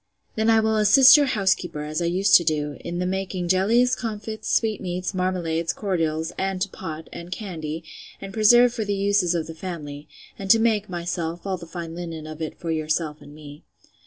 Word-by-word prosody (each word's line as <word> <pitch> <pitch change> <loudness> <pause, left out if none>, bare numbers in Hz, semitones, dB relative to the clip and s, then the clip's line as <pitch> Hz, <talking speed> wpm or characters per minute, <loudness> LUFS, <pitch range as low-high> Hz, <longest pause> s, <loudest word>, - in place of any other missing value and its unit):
Then 220 +1 +1
I 225 0 +5
will 220 0 +1
assist 255 +6 +8
your 290 -2 +4
housekeeper, 190 -9 0
as 155 +2 -3
I - - 0
used 190 +3 +1
to 170 - -2
do, 150 -2 -1
in 175 0 -5
the 180 - -1
making 185 -1 -3
jellies, 230 +7 +3
comfits, 220 -1 -5
sweetmeats, 185 -4 -1
marmalades, 175 -3 -1
cordials; 165 -5 -2
and 190 -1 -1
to 195 +2 -1
pot, 160 -3 -7
and 170 +1 -9
candy, 165 -5 -5 0.4
and 195 -1 -8
preserve 240 +2 +5
for 225 - -2
the 205 -1 -2
uses 200 -3 +1
of 165 -2 -1
the 165 - -8
family; 155 -4 -7 0.3
and 195 -1 -6
to 225 - +8
make, 220 -3 +1
myself, 170 -1 -4
all 190 -1 -2
the 170 -1 -11
fine 165 -1 -7
linen 165 -2 -6
of 155 +1 -9
it 160 - -5
for 165 - -4
yourself 155 -1 -2
and 145 - -13
me. 150 -1 -12
180 Hz, 195 wpm, -23 LUFS, 160-205 Hz, 0.4 s, assist